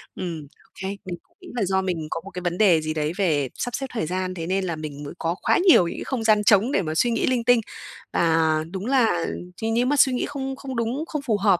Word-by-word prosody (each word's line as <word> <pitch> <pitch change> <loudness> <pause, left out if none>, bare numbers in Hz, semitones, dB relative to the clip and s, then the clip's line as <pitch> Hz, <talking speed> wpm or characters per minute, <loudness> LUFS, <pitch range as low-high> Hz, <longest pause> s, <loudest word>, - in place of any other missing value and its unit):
Ừm, 165 -5 -5 0.2
ô - - -29
kê. 190 - -3 0.2
Mình 180 - -4
cũng - - -38
nghĩ - - -12
là 235 - 0
do 190 +1 +1
mình 170 -5 -3
có 165 - -2
một 195 - -9
cái 180 - -6
vấn 175 0 -2
đề 180 -7 +5
gì 155 0 -2
đấy 155 0 -1
về 150 -9 +1
sắp 245 - -3
xếp 270 - -3
thời 220 - -1
gian, 185 +2 -2
thế 165 -2 -5
nên 190 +1 0
là 170 -3 -2
mình 150 -2 -7
mới 145 - -7
có 170 +1 -1
quá - - +3
nhiều 180 - +7
những - - -5
cái - - -5
không 250 -4 -3
gian 215 -1 +4
trống 210 +4 +4
để 195 - +2
mà 155 -2 -3
suy 240 +7 +2
nghĩ - - +1
linh 250 -2 +1
tinh. 245 -1 +4 0.5
Và 165 -1 +3 0.3
đúng 195 +2 -5
là 235 -10 +2 0.3
ch - - -10
nếu 240 +2 +2
mà 290 +3 +2
suy 260 - +6
nghĩ 250 - 0
không 270 -2 -4
không 265 -1 -7
đúng, 240 +7 -1
không 300 -3 -3
phù 220 -6 0
hợp 195 -3 +3
190 Hz, 280 wpm, -24 LUFS, 170-240 Hz, 0.5 s, nhiều